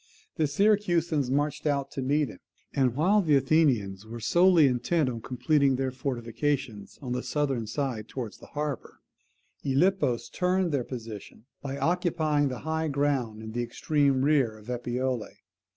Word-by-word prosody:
The 155 -3 +2
Syracusans 170 -5 +2
marched 145 +3 0
out 140 -2 0
to 135 - -4
meet 145 +1 +1
him: 90 - -11 0.3
and 130 -3 +2
while 190 +8 +3
the 155 -6 +3
Athenians 130 -9 +2
were 115 +2 -8
solely 170 +7 +5
intent 130 +4 +1
on 115 -2 -5
completing 135 +3 +2
their 130 0 -1
fortifications 125 -3 -3
on 125 - -4
the 125 0 -1
southern 135 -7 -1
side 115 -3 -3
towards 120 -5 -6
the - - -13
harbour, 145 -4 -5 0.6
Gylippus 140 -5 +1
turned 180 -1 +1
their 140 -4 0
position 115 -3 -8 0.2
by 140 0 -4
occupying 160 -4 +1
the 130 -2 -5
high 160 0 -1
ground 135 -7 -1
in 110 - -7
the 120 +2 -2
extreme 135 +2 +1
rear 135 -7 +2
of 110 +3 -9
Epipolae. 125 -1 -3
135 Hz, 150 wpm, -28 LUFS, 120-150 Hz, 0.6 s, solely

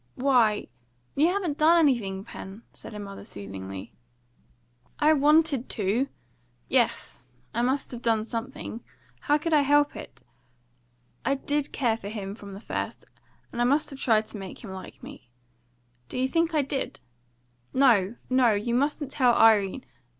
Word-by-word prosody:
"Why, 245 -5 +3 0.5
you 300 +4 +3
haven't 355 -5 -1
done 325 +3 +6
anything, 230 - +2
Pen," 200 0 -10
said - - -11
her - - -7
mother 200 -1 -8
soothingly. 95 -1 -8 1.0
"I 305 +1 +5
wanted 300 -2 +3
to! 220 +7 0 0.6
Yes, 250 - 0 0.3
I 235 - 0
must 260 +3 0
have 240 -2 -7
done 225 -2 +1
something. 230 0 -6 0.4
How 295 - +2
could 320 +2 -2
I 300 - +6
help 290 +1 +3
it? - - -10 1.0
I 275 - +1
did 290 +1 -1
care 235 -5 +1
for 200 -3 -7
him 200 -2 -5
from 200 -2 -10
the - - -8
first, - - -5 0.5
and 240 - -3
I - - +4
must 285 +5 +2
have 275 - -9
tried 220 -4 +3
to 210 - -7
make 190 +3 -9
him 210 - -8
like 190 0 -10
me. 120 - -11 0.8
Do - - -5
you 260 +1 +2
think 330 +3 +1
I 295 - +3
did? 270 0 -4 0.7
No, 235 -6 +4
no! 255 -3 +4
You 210 +3 -1
mustn't 285 +2 0
tell 250 -4 +3
Irene! 220 +1 +4
245 Hz, 160 wpm, -27 LUFS, 210-285 Hz, 1.0 s, done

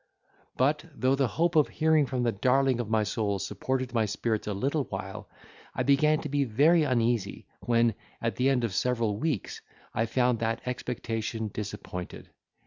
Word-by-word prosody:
But, 145 +3 +2
though 130 +3 +2
the 135 -1 +2
hope 170 +8 0
of 155 -2 +5
hearing 155 -2 +2
from 125 -2 -1
the 120 - +2
darling 130 +4 +2
of 115 -3 -3
my 110 -1 +2
soul 105 -1 -1
supported 130 +6 -3
my 110 -2 +2
spirits 110 +1 -2
a 105 - -1
little 140 +7 0
while, 95 -1 -7 0.5
I - - 0
began 150 +2 +3
to - - -4
be 140 0 +1
very 145 +8 +4
uneasy, 120 -7 0
when, 115 -1 +2 0.3
at 115 -3 -2
the 130 +6 +2
end 130 -3 +2
of 115 -5 -1
several 115 -1 0
weeks 150 - -2 0.3
I 115 - 0
found 125 0 +1
that 115 0 -1
expectation 115 -3 -3
disappointed. 100 -3 -6
120 Hz, 170 wpm, -28 LUFS, 110-135 Hz, 0.5 s, of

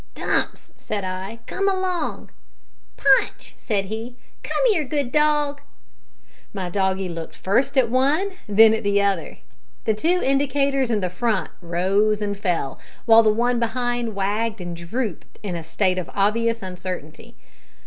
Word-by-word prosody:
"Dumps," - - -1
said 205 -2 -4
I, 190 +5 -5
"come 395 +1 0
along!" 370 -2 -2 0.7
"Punch," 270 -1 +2
said 200 -4 -1
he, 225 +4 -6 0.3
"come - - 0
here, 335 -7 +1
good 280 -2 -2
dog!" 295 -1 +2 0.9
My 185 -3 -3
doggie 190 0 0
looked 165 -2 -7
first 230 +9 +1
at 255 -3 +5
one, 280 - +2 0.2
then 220 +2 +7
at 220 - -1
the 200 0 +2
other. 200 -3 0 0.5
The 220 - +3
two 335 +12 +1
indicators 275 -1 +1
in 210 -5 +1
front 205 +2 -1
rose 195 +5 +1
and 205 -1 -2
fell, 175 -8 -2 0.3
while 225 -1 +8
the 215 -1 +4
one 240 +2 +1
behind 240 -1 -1
wagged 210 +3 -1
and 175 -1 -5
drooped 175 +3 -5
in 190 -4 -3
a 170 - -4
state 185 +3 0
of 180 - -6
obvious 230 +2 +1
uncertainty. 185 +3 -7
220 Hz, 145 wpm, -23 LUFS, 190-255 Hz, 0.9 s, while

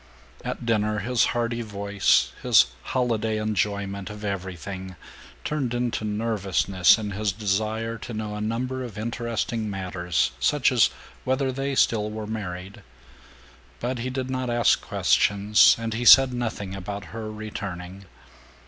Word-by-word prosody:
At - - -5
dinner 110 -2 +1
his 120 +2 +2
hearty 120 0 -1
voice, 100 -2 +1
his - - +6 0.2
holiday 110 - -1
enjoyment 100 -2 -2
of 105 0 -8
everything, 95 -1 -5 0.5
turned 135 -6 -2
into 120 -2 -1
nervousness 105 -4 +2
in 105 -2 -4
his 105 +1 -1
desire 110 +3 -2
to - - -8
know 110 -1 -4
a 105 - -5
number 125 +4 -2
of 115 -5 -8
interesting 115 -1 -2
matters, 90 -3 -1
such 140 - +3
as 120 -3 +4 0.3
whether 130 +1 0
they 135 +1 -2
still 105 -4 +2
were 110 0 -5
married. 100 -1 -6 1.0
But 125 +1 -3
he 125 +2 -3
did 130 0 -3
not 130 -1 -2
ask 120 -1 +3
questions, 100 +1 +4
and 115 -1 -3
he 115 +2 -2
said 130 +1 +8
nothing 110 -5 -3
about 100 +1 -6
her 110 -1 -5
returning. 100 -3 -7
110 Hz, 140 wpm, -25 LUFS, 100-120 Hz, 1.0 s, said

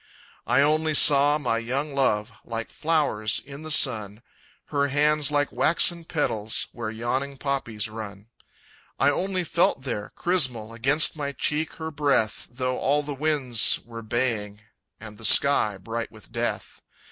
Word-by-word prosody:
I - - +4
only 155 +1 +2
saw 145 +1 +5
my 125 -6 -1
young 135 +5 -3
love, 115 -5 0
Like 115 -1 -5
flowers 145 -10 0
in 140 +1 -11
the 155 - -8
sun 110 -7 +2 0.5
Her 140 -1 +1
hands 150 +1 +2
like 145 -1 0
waxen 170 +1 +2
petals, 110 -10 -2
Where 115 -2 -5
yawning 130 +5 -3
poppies 130 -6 -2
run. 105 -2 -9 0.7
I 145 - +3
only 185 +4 -1
felt 170 -5 +1
there, 110 -6 -4
chrysmal, 130 -11 0
Against 135 +8 +2
my 140 -2 -4
cheek 150 +4 -1
her 160 0 -6
breath, 140 -7 0
Though 130 +1 -3
all 145 +2 +1
the 145 0 -5
winds 135 -5 +1
were 115 0 -9
baying, 110 -3 -2 0.4
And 110 -1 -11
the - - -11
sky 110 -3 +5
bright 115 +4 -5
with - - -15
Death. - - -4
135 Hz, 145 wpm, -25 LUFS, 115-150 Hz, 0.7 s, saw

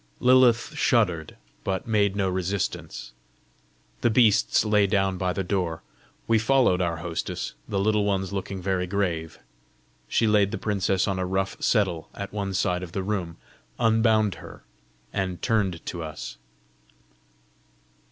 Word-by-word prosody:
Lilith 125 +2 +4
shuddered, 95 - +1 0.3
but 95 -1 -2
made 105 -3 +2
no 100 -2 +1
resistance. 95 +1 -3 0.9
The 120 - +3
beasts 110 -2 +4
lay 105 -1 +3
down 95 -2 +1
by 90 -1 0
the 95 +1 -2
door. 90 -4 -2 0.4
We 115 -1 +4
followed 115 -5 +3
our 85 -2 -1
hostess, 85 0 -4 0.2
the 100 - 0
Little 105 +1 +2
Ones 95 -1 -1
looking 95 -1 -4
very 95 -1 0
grave. 85 -5 -2 0.7
She 115 - +2
laid 105 -2 +4
the - - -4
princess 95 -2 0
on 95 -2 -1
a 90 - 0
rough 95 +1 -1
settle 95 -8 +1
at 100 0 -6
one 100 -2 -3
side 90 -2 0
of 90 -2 -8
the 95 - -2
room, 95 -5 -3 0.4
unbound 110 -2 +3
her, - - -12 0.5
and 95 -3 -2
turned 100 -8 0
to 85 - -5
us. 75 -6 -7
95 Hz, 140 wpm, -25 LUFS, 90-105 Hz, 0.9 s, Lilith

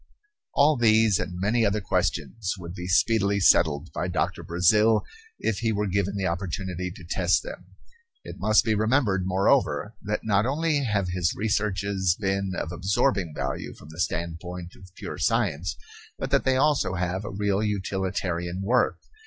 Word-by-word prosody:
All 145 +1 +4
these 110 -3 +4
and 90 -1 -4
many 110 +5 +1
other 105 0 +1
questions 85 - -1
would 85 -1 -8
be 90 -1 -6
speedily 100 +2 +2
settled 80 -4 +3
by 85 +4 -2
Doctor 90 0 -1
Brazil 105 +6 +3 0.3
if 105 - -1
he 115 -1 0
were 105 0 0
given 100 0 -1
the 95 -1 -1
opportunity 90 +1 -3
to 90 -1 -11
test - - +1
them. - - -9 0.6
It - - -9
must 110 0 +4
be 110 - +2
remembered, 110 -4 +1
moreover, 95 +3 +1
that 105 +1 -3
not 105 +1 +2
only 150 0 0
have 100 -5 0
his 90 -1 0
researches 100 -3 0
been 95 -1 -1
of 80 - -3
absorbing 90 -1 0
value 65 0 -4
from 75 - -14
the 80 +2 -12
standpoint 85 0 -4
of 95 -1 -15
pure - - -7
science 80 +5 0 0.4
but - - -4
that - - +2
they 130 0 +3
also 145 -8 +2
have 90 +2 -2
a 105 - -5
real 100 0 0
utilitarian 95 -3 -2
worth. 120 +5 +1
95 Hz, 160 wpm, -26 LUFS, 90-105 Hz, 0.6 s, All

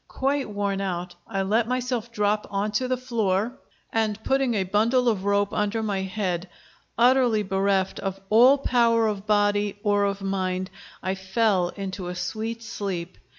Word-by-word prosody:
Quite 275 -1 -1
worn 200 -1 -1
out, 180 -2 -3
I 195 -3 -1
let 220 +4 +1
myself 250 -2 -2
drop 210 -1 0
on 200 +1 -1
to 255 +5 0
the 255 0 0
floor, 230 -2 -1 0.3
and 220 -1 0
putting 270 -3 +1
a 195 - +1
bundle 225 +7 +2
of 205 -4 +1
rope 200 0 +1
under 210 +2 0
my 200 -3 -1
head, 185 -2 -2 0.5
utterly 240 -2 +4
bereft 195 0 0
of 195 -1 -4
all 250 +6 +7
power 235 -4 +3
of 210 -1 -2
body 205 -1 +2
or 205 -1 +3
of 200 0 -2
mind, 185 -1 -2 0.3
I 190 - 0
fell 190 -1 +1
into 190 -2 -5
a 180 - -4
sweet 225 +5 -4
sleep. 190 -5 -4
205 Hz, 160 wpm, -25 LUFS, 195-230 Hz, 0.5 s, all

